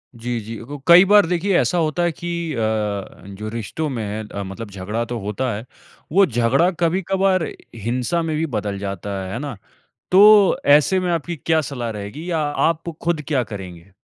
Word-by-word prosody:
जी, 120 +1 -3
जी, 110 +2 -7
क 145 0 -6
कई 175 +2 +9
बार 205 0 +6
देखिए 180 +2 +1
ऐसा 180 - +1
होता 165 +1 0
है 175 - +2
कि 170 -1 -4
अ, - - -5 0.8
जो 110 0 -4
रिश्तों 115 +8 -4
में 120 -5 -3
है 105 +1 -5
अ, 100 -1 -5
मतलब 100 +3 -7
झगड़ा 100 +4 -3
तो 120 0 -4
होता 105 +5 -2
है, 110 +3 -7 0.5
वो 195 +3 +5
झगड़ा 130 +5 +2
कभी-कभार 185 +1 +1 0.3
हिंसा 120 - -1
में 160 -2 -2
भी 160 - 0
बदल 100 -1 -2
जाता 100 0 -5 0.2
है, 95 - -6
है 115 - -3
ना? 140 -5 -5 0.5
तो 205 +1 +7
ऐसे 150 +6 +5
में 180 -1 -1
आपकी 170 +1 -2
क्या 160 +2 +1
सलाह 120 -4 -4
रहेगी 110 - -6
या 165 - 0 0.3
आप 165 0 -3
खुद 170 -2 0
क्या 140 -5 +1
करेंगे? 90 -2 -9
145 Hz, 190 wpm, -21 LUFS, 110-170 Hz, 0.8 s, कई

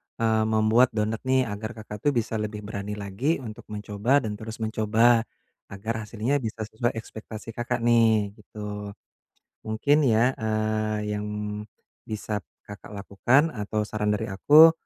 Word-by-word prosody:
eee, 110 -1 +2
membuat 110 +3 +4
donat 110 +1 0
nih, 130 0 +4
agar 110 +3 -5
Kakak 105 -1 -8
tuh - - +6
bisa 115 -1 0
lebih 105 0 -4
berani 105 0 -4
lagi 105 - -1
untuk 110 -3 -9
mencoba 105 +6 +1
dan 105 -2 -4
terus 110 0 -6
mencoba, 110 +2 +3 0.4
agar 100 +4 -4
hasilnya 120 +6 0
bisa 110 -3 -4
sesuai 120 +2 -1
ekspektasi 110 0 -8
Kakak 120 +1 -2
nih, 115 -3 +4
gitu. 105 -1 -7 0.7
Mungkin 140 +7 +3
ya, 120 +2 +3
eee, 110 -1 -1
yang 105 - -4 0.8
bisa 105 -1 -3 0.2
Kakak 105 0 -11
lakukan 120 +10 +2
atau 105 -4 -2
saran 105 0 0
dari 105 - -3
aku, 150 +11 +8
110 Hz, 140 wpm, -26 LUFS, 105-115 Hz, 0.8 s, aku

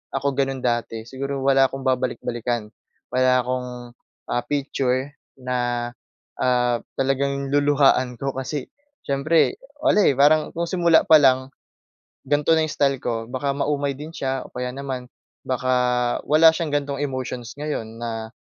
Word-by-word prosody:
ako 140 +1 0
gano'n 135 -1 -1
dati 120 -2 -1
siguro 135 +3 -4
wala 135 0 +5
akong 135 +1 -7
babalik-balikan. 120 -3 -2 0.4
Wala 130 0 +3
akong, 125 0 -3 0.6
ah, 120 - 0
picture 135 -1 -1 0.3
na, 120 -2 -2 0.5
ah, 125 -1 +2 0.2
talagang 140 +1 0
luluhuhaan 140 -3 +3
ko 135 +3 -2
kasi 135 +1 -4 0.4
siyempre 145 +4 +2 0.2
wala, - - +4
eh, 140 - +3
parang 150 +2 +4
kung 170 +1 -1
simula 170 -2 +4
pa 160 -1 +7
lang, 130 -1 +3 0.8
ganito 145 +2 +3
na 160 -1 +2
style 140 -3 +1
ko 115 -2 -3
baka 140 +2 -1
maumay 140 -1 -1
din 150 +4 -8
siya 135 -3 -2
o - - -22
kaya 125 0 -3
naman 135 -2 -5 0.4
baka 125 -1 +1
wala 160 +2 +6
siyang 160 -3 -2
ganitong 140 -1 -2
emotions 130 -3 -4
ngayon 115 -7 -4
na, 115 -1 -4
135 Hz, 140 wpm, -23 LUFS, 125-140 Hz, 0.8 s, pa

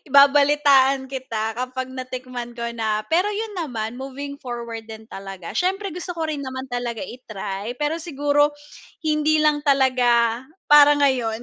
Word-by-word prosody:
babalitaan 280 -1 +5
kita 225 -5 -4
kapag 255 +1 -4
natikman 255 -2 -6
ko 235 -1 -3
na, 220 -2 0
pero 365 +6 +2
yun 425 0 -4
naman 245 -9 -4
moving 275 +2 -6
forward 235 -2 -6
din 220 0 -11
talaga, 195 -4 -8
siyempre 385 +3 0
gusto 360 0 -5
ko 330 -2 -3
rin 290 -2 -3
naman 260 0 -6
talaga 245 -2 -3
i-try 215 -4 -6
pero 295 +2 0
siguro 290 -2 +1 0.5
hindi 310 0 +2
lang 300 -1 +2
talaga 250 -4 +3 0.3
para 295 0 +8
ngayon. 245 -5 +1
260 Hz, 140 wpm, -22 LUFS, 235-295 Hz, 0.5 s, para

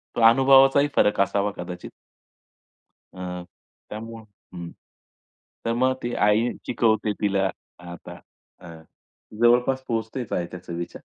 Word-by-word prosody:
तो 120 - -1
अनुभवाचाही 135 +3 +6
फरक 105 - +3
असावा 100 +1 0
कदाचित. 90 0 -7 1.2
अ, 90 -1 -6 0.5
त्यामुळं 115 +1 -8 0.3
हं. 85 -1 -7 1.0
तर 115 - 0
मग 130 +2 +2
ती 120 - -3
आई 105 +4 +3 0.2
शिकवते 110 -2 +1
तिला 95 -2 +1 0.4
आता 85 - -10 0.4
हं, 85 -2 -12 0.6
जवळपास 125 +2 +3
पोहचतेच 115 +1 -3
आहे 85 - -1
त्या 90 0 -9
चवीच्या. 85 0 -6
110 Hz, 115 wpm, -24 LUFS, 90-120 Hz, 1.2 s, अनुभवाचाही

